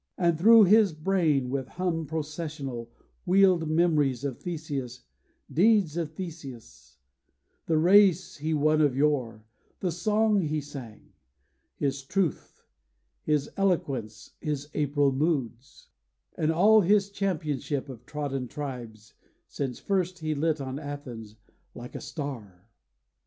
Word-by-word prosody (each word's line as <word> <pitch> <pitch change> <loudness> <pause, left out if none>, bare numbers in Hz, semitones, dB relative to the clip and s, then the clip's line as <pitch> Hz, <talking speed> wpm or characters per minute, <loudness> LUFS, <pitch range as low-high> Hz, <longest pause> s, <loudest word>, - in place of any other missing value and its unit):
And 170 -1 +2
thro' 220 +7 +7
his 205 -1 +5
brain, 155 -6 +1
with 135 -2 -2
hum 170 -2 -2
processional, 150 -6 -5 0.3
Wheeled 185 -3 +4
memories 155 -6 +2
of 135 -4 -4
Theseus, 145 -7 -5 0.5
deeds 195 -3 +3
of 165 -3 -3
Theseus, 130 - -9 0.7
The 160 - +2
race 185 +1 +4
he 155 +2 -3
won 155 +1 +3
of 140 -4 +2
yore, 125 -7 0 0.3
the 180 - -1
song 210 +4 +2
he 155 -2 -1
sang; 135 -7 -10 0.6
His 140 -1 -2
truth, 180 +3 -2 0.6
his 150 -2 0
eloquence, 135 - -1
his 145 -1 -3
April 145 -1 +1
moods, 135 -3 -3 0.5
And 155 0 +1
all 210 +6 +5
his 200 +1 +2
championship 150 -8 -2
of 125 -3 -10
trodden 140 -4 -3
tribes, 120 -6 -7 0.3
Since 135 -4 -4
first 185 -2 -1
he 155 -2 -2
lit 155 +1 0
on 135 0 -5
Athens, 130 -8 -8 0.4
like 120 +1 -9
a - - -6
star. 110 - -7
150 Hz, 120 wpm, -27 LUFS, 135-175 Hz, 0.7 s, thro